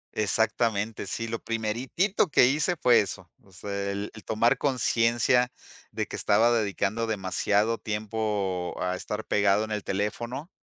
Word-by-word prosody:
Exactamente, 110 Hz, 0 st, 0 dB
sí, 115 Hz, +4 st, -3 dB
lo 115 Hz, 0 st, -3 dB
primeritito 120 Hz, -, 0 dB
que 125 Hz, -, +5 dB
hice 155 Hz, +7 st, +1 dB
fue 120 Hz, -6 st, +5 dB
eso. 95 Hz, -4 st, -5 dB
O 95 Hz, -, -22 dB
sea, 100 Hz, +1 st, -4 dB
el 100 Hz, +1 st, -4 dB
el 110 Hz, -, -12 dB
tomar 115 Hz, +2 st, +2 dB
conciencia 125 Hz, -1 st, +2 dB, 0.4 s
de -, -, -2 dB
que -, -, -6 dB
estaba 110 Hz, +3 st, +3 dB
dedicando 110 Hz, 0 st, 0 dB
demasiado 105 Hz, +2 st, 0 dB
tiempo 105 Hz, -4 st, -2 dB
a 90 Hz, 0 st, -1 dB
estar 105 Hz, +3 st, -5 dB
pegado 100 Hz, 0 st, +2 dB
en 110 Hz, -, -5 dB
el 105 Hz, -2 st, -3 dB
teléfono 120 Hz, -, -3 dB
110 Hz, 145 wpm, -27 LUFS, 100-115 Hz, 0.4 s, que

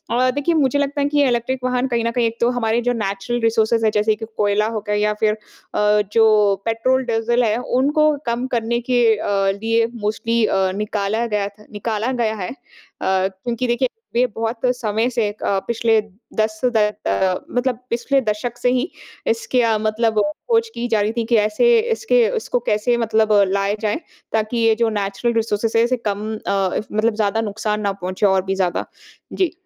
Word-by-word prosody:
और 255 Hz, +1 st, +3 dB
देखिए 290 Hz, +5 st, 0 dB
मुझे 285 Hz, -1 st, +2 dB
लगता 285 Hz, 0 st, -1 dB
है 280 Hz, -, +2 dB
कि 290 Hz, -1 st, +3 dB
इलेक्ट्रिक 250 Hz, +2 st, -1 dB
वाहन 255 Hz, +1 st, 0 dB
कहीं 235 Hz, -2 st, 0 dB
न 230 Hz, -, +1 dB
कहीं 240 Hz, -1 st, +1 dB
एक 230 Hz, +1 st, -5 dB
तो 235 Hz, -, +4 dB
हमारे 235 Hz, -1 st, 0 dB
जो 245 Hz, +1 st, 0 dB
नेचुरल 215 Hz, +2 st, -2 dB
रिसोर्स 225 Hz, 0 st, +2 dB
है 215 Hz, -, +3 dB
जैसे 210 Hz, 0 st, +2 dB
कि 220 Hz, +1 st, -7 dB
कोयला 210 Hz, +1 st, +2 dB
हो 220 Hz, -1 st, -2 dB
गया 210 Hz, -, +1 dB
या 210 Hz, 0 st, +1 dB
फ़िर 215 Hz, -1 st, +3 dB
अ, 210 Hz, -1 st, -1 dB
जो 215 Hz, -3 st, +4 dB
पेट्रोल 255 Hz, +4 st, +1 dB
डीज़ल 235 Hz, +1 st, +1 dB
है 220 Hz, 0 st, +1 dB, 0.2 s
उनको 305 Hz, +3 st, +3 dB
कम 240 Hz, +2 st, -1 dB
करने 235 Hz, +1 st, 0 dB
के 245 Hz, -1 st, +3 dB
अ, -, -, -5 dB, 0.3 s
लिए 230 Hz, 0 st, +2 dB
मोस्टली 225 Hz, +2 st, -1 dB
अ, 190 Hz, -2 st, +1 dB
निकाला 210 Hz, +2 st, -1 dB
गया 205 Hz, -2 st, -1 dB
था 205 Hz, +1 st, -15 dB
निकाला 215 Hz, +3 st, -2 dB
गया 235 Hz, -3 st, 0 dB
है। 185 Hz, -3 st, -4 dB
अ, -, -, -6 dB, 0.5 s
क्योंकि 190 Hz, +6 st, -1 dB
देखिए 240 Hz, +2 st, +1 dB, 0.3 s
वे 250 Hz, +1 st, +4 dB
बहुत 225 Hz, +1 st, -2 dB, 0.2 s
समय 225 Hz, +1 st, 0 dB
से 230 Hz, -4 st, 0 dB
अ, 200 Hz, -2 st, -1 dB
पिछले 230 Hz, -1 st, +2 dB, 0.4 s
10 215 Hz, 0 st, 0 dB
मतलब 215 Hz, -, 0 dB
पिछले 245 Hz, +4 st, +1 dB
दशक 225 Hz, +2 st, -3 dB
से 245 Hz, 0 st, +1 dB
ही 255 Hz, +7 st, 0 dB, 0.4 s
इसके 230 Hz, +2 st, +1 dB
अ, 225 Hz, -2 st, +2 dB
मतलब 220 Hz, 0 st, +1 dB, 0.3 s
खोज 455 Hz, 0 st, +2 dB
की 240 Hz, +1 st, -2 dB
जा 220 Hz, -3 st, +1 dB
रही 210 Hz, +2 st, +1 dB
थी 230 Hz, -, 0 dB
कि 235 Hz, 0 st, +2 dB
ऐसे 215 Hz, -, +3 dB
इसके 470 Hz, +1 st, +3 dB
इसको -, -, -1 dB
कैसे 215 Hz, +3 st, +2 dB
मतलब 220 Hz, -2 st, +2 dB, 0.2 s
लाया 200 Hz, +1 st, +1 dB
जाए 215 Hz, +7 st, 0 dB, 0.3 s
ताकि 220 Hz, +2 st, 0 dB
ये 225 Hz, -1 st, +3 dB
जो 230 Hz, 0 st, +1 dB
नेचुरल 205 Hz, +3 st, -1 dB
रिसोर्सेज़ 225 Hz, 0 st, 0 dB
हैं 230 Hz, -, +5 dB
इसे 250 Hz, +1 st, 0 dB
कम 205 Hz, +1 st, -2 dB, 0.2 s
अ, 195 Hz, -2 st, +1 dB, 0.2 s
मतलब 215 Hz, +1 st, +1 dB
ज़्यादा 215 Hz, +1 st, 0 dB
नुकसान 210 Hz, 0 st, -2 dB
ना 200 Hz, -1 st, 0 dB
पहुँचे 185 Hz, +3 st, -1 dB
और 190 Hz, -1 st, +4 dB
भी 195 Hz, 0 st, -1 dB
ज़्यादा। 185 Hz, -2 st, -1 dB, 0.5 s
जी। 370 Hz, -4 st, +1 dB
225 Hz, 190 wpm, -20 LUFS, 210-245 Hz, 0.5 s, हैं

